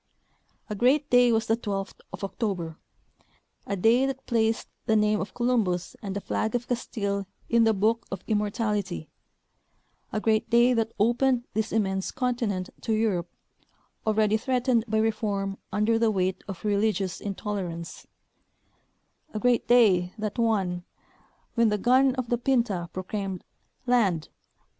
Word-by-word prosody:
A - - -4
great 260 +7 +2
day 245 -1 +6
was 225 -1 +2
the 225 - +2
twelfth 200 -4 -4
of - - -8
October; 190 -5 -3 0.9
a 200 - -1
day 230 +7 +4
that 270 0 -5
placed 225 -2 +1 0.2
the 220 - +3
name 210 0 +3
of 190 0 -6
Columbus 220 -8 0
and 200 -2 -5
the 200 - -2
flag 220 +3 -1
of 240 0 -2
Castile 200 -5 -2 0.2
in 235 -1 +4
the 225 - +4
book 225 +4 +1
of 195 -2 -6
immor 210 -1 +1
tality; 205 -7 -2 1.0
a 215 - -1
great 220 0 +1
day 240 +2 +5
that 225 -1 0
opened 240 +3 +2
this 220 +1 -1
immense 190 -3 0
continent 235 -7 -2
to 225 - -1
Europe, 205 -6 0 0.8
already 215 0 +3
threatened 250 -1 +1
by 220 0 0
reform 205 -3 -1
under 220 +2 +2
the 230 -1 +3
weight 185 -2 -1
of 195 0 -7
relig 210 +1 +2
ious 190 -2 -4
intolerance; 190 -4 -5 1.3
a - - 0
great 245 +1 +2
day, 190 -7 +4
that 215 0 -4
one, 195 -6 +1 0.7
when 230 -2 +3
the 210 - +1
gun 255 +5 +4
of 255 -3 -3
the 240 - +1
Pinta 235 -10 0
proclaiming 190 0 -4 0.4
Land 205 -11 +2
215 Hz, 150 wpm, -27 LUFS, 195-235 Hz, 1.3 s, day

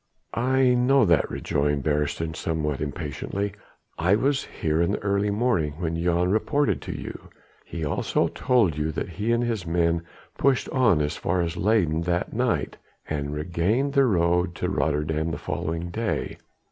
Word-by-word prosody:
"I 130 +2 +3
know 125 +1 +4
that," 85 -5 +3
rejoined 75 -1 -1
Beresteyn 75 +2 -1
somewhat 75 -4 -2
impatiently. 80 +6 -3 0.5
"I 90 +5 +4
was 135 +5 +1
here 80 +1 -1
in 85 - +1
the - - -3
early 100 0 +1
morning 100 -8 +1
when 80 +1 -3
Jan 90 +1 +2
reported 140 +7 +1
to - - -6
you. - - -8 0.4
He 80 -2 -4
also 75 - 0
told 115 - +2
you 75 +1 0
that 80 - -3
he 105 +7 -2
and 120 +1 +2
his 110 -7 -2
men 85 0 +1 0.4
pushed 135 -2 +2
on 115 - +3
as 75 - -2
far 90 +1 0
as 85 -2 -2
Leyden 90 -7 +2
that 90 +1 -1
night - - 0 0.3
and 70 -2 -3
regained 90 - 0
the 140 -2 +5
road 90 -4 +2
to - - -2
Rotterdam 75 +1 0
the 75 - -3
following 85 +3 -3
day. 110 +3 -2
85 Hz, 160 wpm, -25 LUFS, 80-110 Hz, 0.5 s, the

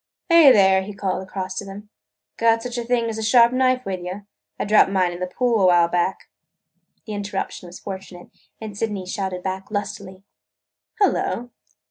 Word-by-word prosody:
"Hey, 335 -5 +8
there!" 190 -4 +5
he 200 +1 -8
called 190 -2 -2
across 185 0 -5
to 200 - -6
them. 200 +2 -10 0.5
"Got 230 0 +2
such 245 -1 -4
a - - -3
thing 240 0 0
as 220 -1 -4
a - - -3
good 215 - -1
sharp 235 +1 +5
knife 255 0 +1
with 190 -2 -3
you? 185 +3 -7 0.3
I - - -1
dropped 210 -1 +5
mine 185 -2 +1
in 175 - -8
the 180 - -2
pool 235 +2 0
a 185 - +5
while 175 -1 +5
back." 175 +2 -1 0.8
The 215 - -6
interruption 200 -3 -5
was 175 - -11
fortunate, 190 -2 -9 0.3
and 215 -2 -8
Sydney 205 -3 -3
shouted 185 -1 -4
back 190 0 -4
lustily: 200 -2 -5 0.8
"Hullo! 245 - 0
200 Hz, 185 wpm, -22 LUFS, 185-230 Hz, 0.8 s, Hey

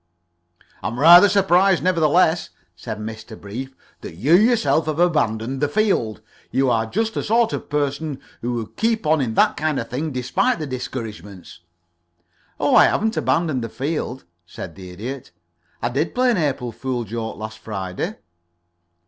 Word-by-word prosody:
"I - - -2
am 115 +3 -4
rather 175 +6 +9
surprised, 190 -1 +3
nevertheless," 170 -1 +2 0.3
said 110 - -6
Mr. 110 +1 -8
Brief, 130 +7 -7 0.3
"that - - -9
you 130 - +1
yourself 215 -5 +3
have 155 -1 -1
abandoned 135 -7 0
the 145 - +3
field. 145 - 0 0.3
You 135 -1 +1
are 115 -1 +1
just 225 - -1
the - - -2
sort 230 +1 +2
of - - -5
person 145 0 -2 0.2
who 120 +1 -2
would 115 -2 -5
keep 225 -3 0
on 155 -1 +3
in 115 -4 -2
that - - +3
kind 155 -1 0
of 115 - -6
thing, 150 +5 -2
despite 140 - 0
the 155 - -4
discouragements." 110 - -7 1.0
"Oh, - - +2
I - - +8
haven't 220 +1 +1
abandoned 155 -7 0
the 115 - -4
field," 135 0 -4 0.2
said 85 - -8
the 95 0 -11
Idiot. 120 +9 -7 0.5
"I 120 - +1
did 140 +7 -2
play 250 0 +3
an 230 - +1
April 135 -7 -1
fool 125 +1 -3
joke 110 +1 -5
last 110 +1 -7
Friday." 95 -4 -4
135 Hz, 165 wpm, -21 LUFS, 115-175 Hz, 1.0 s, rather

